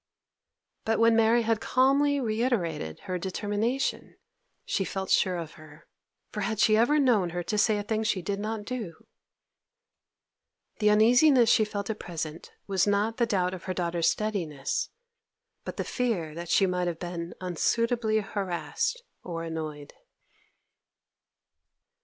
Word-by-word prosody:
But 225 0 +1
when 230 0 +5
Mary 225 +1 +4
had 225 -1 0
calmly 280 +3 +3
reiterated 215 - -1
her 180 -1 -4
determination, 205 +8 -2 0.5
she 195 - 0
felt 190 0 -4
sure 185 -1 +3
of 165 -2 -6
her. 150 0 -15 0.5
For 210 - -4
had 215 +2 -1
she 215 -1 +5
ever 240 +7 +4
known 235 -11 +3
her 175 +1 -4
to 210 - -2
say 215 0 +3
a 205 - -3
thing 220 +1 -1
she 210 -4 -1
did 200 +2 -2
not 215 0 -4
do? 215 -9 -6 1.7
The 210 -1 +4
uneasiness 240 +4 +5
she 215 - +4
felt 205 0 -4
at 215 - -6
present 165 -1 -6
was 195 0 +1
not 205 +3 +1
the 235 -2 +2
doubt 185 -4 0
of 185 - -8
her 185 -1 -3
daughter's 170 -1 +1
steadiness, 170 -10 -2 0.8
but - - -6
the - - -1
fear 210 -12 -2
that 170 +1 -7
she 195 - +4
might 180 -1 -1
have 170 -2 -2
been 170 -1 -6
unsuitably 220 +5 0
harassed 200 - -3 0.2
or 165 -2 -5
annoyed. 155 -3 -6
205 Hz, 145 wpm, -28 LUFS, 175-225 Hz, 1.7 s, when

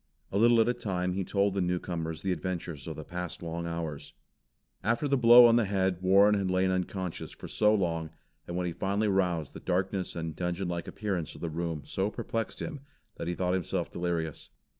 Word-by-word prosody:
A 100 - 0
little 120 +1 +6
at 110 - +4
a 120 - +3
time 90 -6 -2
he 95 +1 -1
told 100 +1 +1
the 100 - 0
newcomers 85 -3 -2
the 95 - 0
adventures 85 -3 -4
of 80 - -4
the 80 - -7
past 90 +1 -5
long 85 0 -4
hours. 80 -3 -5 0.7
After 115 +8 +1
the 140 - +3
blow 120 -1 +9
on 115 0 +6
the 120 - +3
head 95 -2 0
Warren 100 +3 +6
had 100 -2 0
lain 95 0 +2
unconscious 95 -1 -3
for - - -9
so 105 0 +3
long, 85 -5 -1 0.4
and 85 - -4
when 90 - -1
he 85 - -2
finally 100 +5 0
roused 90 -6 0
the - - -8
darkness 95 +1 -1
and 80 -2 -4
dungeon 90 +1 -2
like 85 -1 -3
appearance 95 -7 -3
of - - -12
the 85 - -3
room 80 -2 -3
so 95 +2 -1
perplexed 115 +1 -4
him, 150 -4 -5 0.4
that - - -4
he 85 - -1
thought 90 0 0
himself 95 -3 -1
delirious. 85 -3 -3
90 Hz, 205 wpm, -29 LUFS, 85-100 Hz, 0.7 s, blow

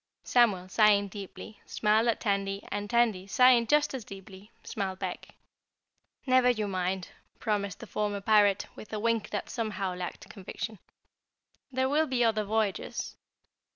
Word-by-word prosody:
Samuel, 210 -7 +3
sighing 205 0 +4
deeply, 200 +2 -9
smiled 220 +2 +2
at 230 - +1
Tandy 200 -1 -1
and 205 0 -3
Tandy, 225 -6 +2
sighing 245 +2 +5
just 295 +3 +3
as 260 -4 -4
deeply, 195 +1 -12
smiled 190 -3 -4
back. 185 -2 -6 0.9
"Never 255 -1 +4
you 215 -4 0
mind," 185 -1 -2 0.3
promised 200 -3 -2
the - - -7
former 205 -1 -2
Pirate 205 -1 +3
with 215 - -11
a 215 - -2
wink 230 0 0
that 205 - -3
somehow 205 -5 -3
lacked 180 -1 -6
conviction, 210 +1 -7 0.9
"there'll 270 +4 +1
be 255 -2 +1
other 220 -2 +2
voyages!" 215 -1 -2
210 Hz, 140 wpm, -29 LUFS, 195-230 Hz, 0.9 s, sighing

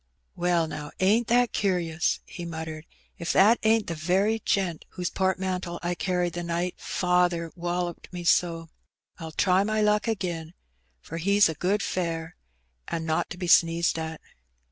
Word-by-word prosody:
'^Well, 175 -2 +1
now, 150 -1 -6
ain't 215 +5 +3
that 245 0 +3
cur'us!" 175 -5 0
he 175 - -8
muttered. 160 -1 -6 0.3
"If 170 - -1
that 215 +5 +6
ain't 220 0 +3
the 170 - -3
very 190 +7 +1
gent 185 -5 0
whose 180 -2 -3
portmantle 185 -2 -1
I 175 +1 0
carried 180 -1 -1
the 175 - -3
night 170 +1 -2
faather 180 -2 +1
woUoped 175 0 -3
me 175 -1 -6
so. 165 -1 +2 0.5
I'll 160 -1 -6
try 185 +4 +3
my 215 +1 0
luck 210 +1 +2
agin, 175 -6 -3 0.5
for 165 - -7
he's 200 +3 +4
a - - -2
good 190 +6 0
fare, 165 -2 -3 0.5
an' 165 -1 -3
not 160 -1 0
to - - -7
be 180 - -4
sneezed 170 -1 +4
at." 160 -1 -5
175 Hz, 160 wpm, -26 LUFS, 165-190 Hz, 0.5 s, that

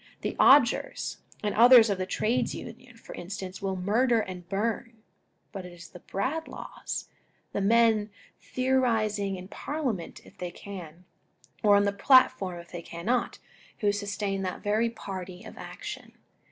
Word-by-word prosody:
The - - -3
Odgers 265 -3 +4 0.3
and 210 - 0
others 240 0 +8
of 195 - -1
the 185 - -2
Trades 235 +5 0
Union, 235 +1 -10
for - - -11
instance, 185 +1 -7
will 195 -1 -1
murder 225 +6 +2
and 180 -4 -6
burn; 220 +2 -2 0.5
but 195 -3 -6
it 180 -1 -10
is 175 -1 -12
the 180 - -12
Bradlaughs, 275 - -4 0.5
and 200 0 0
men 225 -2 +4 0.3
theorising 225 -6 0
in 185 0 -8
Parliament 250 - -4
if - - -17
they 180 - -3
can, 180 -3 -10 0.6
or 205 -2 +6
on 200 - +5
the 200 - +2
platform 200 -5 +4
if 170 - -13
they 175 - -6
cannot, 200 +10 -2 0.4
who 205 -1 +3
sustain 200 -1 -2
that 185 -1 -4
very 215 +3 +2
party 190 -5 -7
of - - -10
action. - - -8
205 Hz, 150 wpm, -28 LUFS, 185-230 Hz, 0.6 s, others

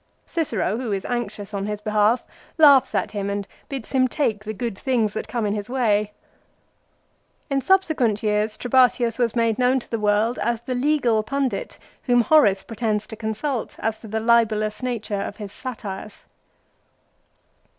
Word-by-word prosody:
Cicero, 230 - -1
who 245 -3 -3
is 195 -1 -2
anxious 215 -4 -4
on 200 0 -2
his 210 -1 -3
behalf, 215 +3 +2 0.3
laughs 285 -4 +6
at - - 0
him 200 -1 -3
and 200 0 -3 0.2
bids 270 -5 -6
him 260 -1 +3
take 225 -6 -1
the 215 - -4
good 220 0 -4
things 225 -2 0
that - - -4
come 225 0 -2
in 205 - 0
his 210 +1 -4
way. 215 -5 +1 1.4
In 275 0 +1
subsequent 275 - +2
years 210 0 0
Trebatius 245 -2 +2
was 235 -2 +1
made 230 -1 +1
known 250 +1 +3
to - - -12
the 230 - -1
world 210 +3 +1
as 235 -1 -1
the 255 - -3
legal 250 -4 +2
pundit 260 -2 -2 0.3
whom 245 -2 +4
Horace 215 -7 +4
pretends 215 -2 -2
to 220 - -9
consult 220 +4 -3
as 220 0 -2
to 225 - -10
the 220 +1 -2
libellous 220 -2 +2
nature 220 -5 -2
of 205 - -5
his 205 -2 -7
satires. 215 -5 -7
225 Hz, 165 wpm, -23 LUFS, 210-250 Hz, 1.4 s, laughs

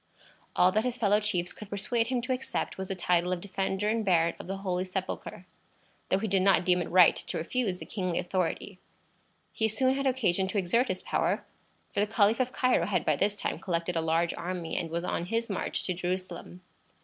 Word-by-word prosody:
All 180 - +5
that 215 +3 +1
his 250 -1 -1
fellow 210 -2 +3
chiefs 180 -5 -1
could 210 - -10
persuade 225 +3 0
him 245 -1 -1
to 255 +1 0
accept 255 +1 -3
was 190 - -3
the 195 - -3
title 180 0 +1
of 180 - 0
Defender 195 +1 -2
and 225 +1 +1
Baron 170 -4 +3
of - - -9
the 195 +1 -3
Holy 185 -2 -1
Sepulchre, 185 -1 -5 0.6
though 190 - +3
he 220 +3 -2
did 195 -1 +2
not 190 -2 +4
deem 180 -1 +3
it 170 - -4
right 180 -1 +7
to - - -4
refuse 190 +3 -1
the - - -8
kingly 185 -4 -2
authority. 185 +1 -2 0.7
He 220 - +1
soon 260 +5 +2
had 275 0 0
occasion 205 -8 +1
to 190 - -3
exert 215 +7 +2
his 185 -3 -3
power, - - 0 0.5
for - - -1
the 205 - +2
Caliph 215 +1 +3
of 255 0 +1
Cairo 255 -10 +2
had 180 -6 0
by 155 - +3
this 200 +7 0
time - - -3
collected 170 -1 -2
a 165 - +1
large 165 +1 +1
army, 175 -1 -4
and 165 - -2
was 170 +1 -2
on 170 - -2
his 230 +1 -1
march 190 - -2
to 185 - 0
Jerusalem. 180 0 -4
190 Hz, 215 wpm, -29 LUFS, 180-215 Hz, 0.7 s, right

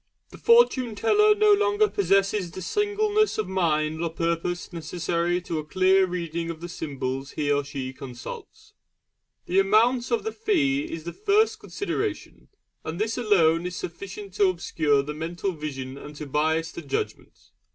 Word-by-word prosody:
The - - -12
Fortune 275 - +4
teller 420 - +4
no 425 0 +5
longer 415 +1 +3
possesses 195 - +1
the 180 +3 -8
singleness 415 - +1
of 215 -3 -1
mind 160 -4 0
or 170 - 0
purpose 170 +2 -2
necessary 170 +1 -1
to 165 -3 -3
a - - -4
clear 185 +4 +3
reading 170 -2 -3
of 165 -1 -5
the 175 +1 -7
symbols 135 -4 -4
he 145 -1 -1
or 145 0 +2
she 135 -2 -5
consults. 130 -3 -10 0.7
The 185 +2 +2
amount 230 +5 +3
of 235 - 0
the 445 - -2
fee 315 -10 0
is 165 - -5
the 170 - -6
first 420 +2 +2
consideration, 405 - -4 0.4
and 160 +1 -5
this 220 +1 0
alone 175 -7 +3
is 180 - -6
sufficient 195 +3 -7
to 200 -1 +4
obscure 155 -5 +1
the 150 +2 -5
mental 170 +5 -3
vision 140 -4 -6
and 150 +1 -10
to 150 - -6
bias 160 +3 0
the - - -7
judgment. 140 -4 -5
175 Hz, 160 wpm, -25 LUFS, 155-225 Hz, 0.7 s, no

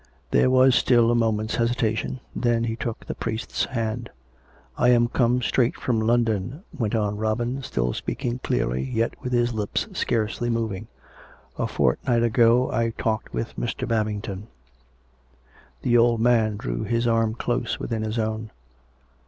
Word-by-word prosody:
There - - +4
was 130 0 +5
still 120 -2 +4
a - - +2
moment's 110 -1 0
hesitation. 115 +1 0
Then 120 -1 +1
he 115 -1 -1
took 115 -1 -5
the - - -4
priest's 110 +2 -2
hand. 115 -2 -3 0.4
" - - -33 0.3
I 125 - +4
am 120 -1 +5
come 125 +1 +1
straight 120 0 +2
from 115 -3 -1
London," 115 - 0
went 115 -3 -1
on 105 -2 0
Robin, 120 +5 -1
still 60 - -1
speaking 120 +1 -3
clearly, 65 - -1
yet 115 - -1
with 125 - -4
his 120 -1 +2
lips 105 -2 -2
scarcely 115 +1 -1
moving. 110 -3 -2 0.4
" - - -25
A - - +1
fortnight 115 - +1
ago 120 +2 +4
I 115 0 0
talked 110 0 -1
with 115 - -4
^Ir. 120 - -3
Babington." 105 -2 -2 1.4
The 120 -1 +4
old 115 -1 +3
man 110 -3 +3
drew - - -3
his 115 0 0
arm 115 -1 +2
close 120 0 -2
within 115 -2 -3
his 110 +1 -3
own. 110 0 -2
115 Hz, 155 wpm, -24 LUFS, 110-120 Hz, 1.4 s, was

